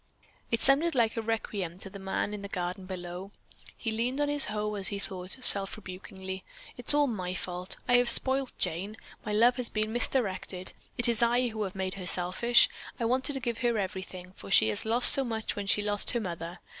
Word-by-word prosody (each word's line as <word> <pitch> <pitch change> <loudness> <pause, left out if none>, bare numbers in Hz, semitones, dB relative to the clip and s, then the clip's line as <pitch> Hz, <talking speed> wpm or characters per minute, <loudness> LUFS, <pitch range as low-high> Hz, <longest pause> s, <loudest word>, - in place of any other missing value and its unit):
It 230 - -1
sounded 290 +4 +3
like 230 -3 +1
a 225 - -2
requiem 210 -6 -4
to 195 - -10
the 195 +1 -10
man 190 +2 -3
in 210 - -6
the 200 - -6
garden 185 0 -5
below. 180 0 -7 0.5
He 225 - -4
leaned 240 +5 -2
on 290 0 0
his 290 -1 +5
hoe 210 0 -3
as 200 -3 -1
he 200 - +1
thought, 185 -1 -5
self 200 -4 +6
rebukingly, 190 -1 -8 0.3
"It - - -12
is - - +9
all 295 0 +4
my 185 -8 -4
fault. 180 0 -4
I 245 -1 +5
have 245 -1 +3
spoiled 265 +1 +3
Jane. 195 +7 -2 0.3
My 210 - -5
love 235 +4 +3
has 250 -2 +1
been 215 0 -2
misdirected. 190 -7 -2 0.2
It 240 - +6
is 235 -2 0
I 240 +1 +2
who 220 -1 -6
have 195 -2 -4
made 190 -1 -3
her 185 -2 -6
selfish. 190 +8 +4 0.3
I 235 - -1
wanted 260 +4 +2
to 270 - -3
give 235 -2 -4
her 235 -1 0
everything, 185 -2 -6
for - - -12
she 110 - +5
had 105 - -3
lost 235 +3 +7
so 275 - +2
much 225 -3 -4
when 205 -1 -5
she 205 +1 +2
lost 205 0 0
her 240 - -1
mother. 175 -3 -6
210 Hz, 220 wpm, -28 LUFS, 185-240 Hz, 0.5 s, is